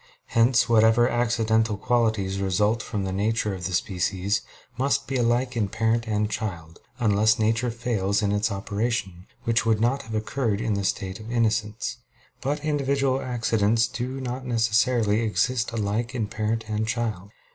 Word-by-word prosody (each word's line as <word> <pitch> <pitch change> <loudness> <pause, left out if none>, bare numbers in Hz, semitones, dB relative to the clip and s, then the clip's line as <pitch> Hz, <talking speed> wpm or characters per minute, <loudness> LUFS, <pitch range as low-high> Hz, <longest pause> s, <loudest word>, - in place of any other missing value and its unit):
Hence 115 +1 +4
whatever 115 +1 +5
accidental 115 -3 +1
qualities 110 -4 0
result 105 +4 +1
from 105 -2 -3
the 95 - -2
nature 105 +2 0
of 90 -2 -4
the - - -6
species, 95 +2 0 0.3
must 140 +1 +1
be 135 - -4
alike 120 +1 +1
in 110 -4 +1
parent 115 +2 0
and 105 -1 +1
child, 85 -7 -5 0.2
unless 110 -1 +3
nature 115 +3 +1
fails 105 -4 -1
in 100 - +1
its 105 +1 +1
operation, 100 -2 -3 0.2
which 115 0 +2
would 110 -2 +2
not 125 +5 +1
have 110 -4 -7
occurred 110 0 -1
in 110 - 0
the 100 0 -1
state 95 +1 -2
of 110 +2 -8
innocence. 110 +1 0 0.4
But 145 +2 -2
individual 140 -3 +1
accidents 115 -2 +1
do 125 +4 -4
not 130 0 -4
necessarily 115 -2 +2
exist 115 +4 0
alike 115 +3 -2
in 115 -3 0
parent 110 +1 -2
and 110 0 -1
child. 110 -5 -2
110 Hz, 155 wpm, -25 LUFS, 105-120 Hz, 0.4 s, whatever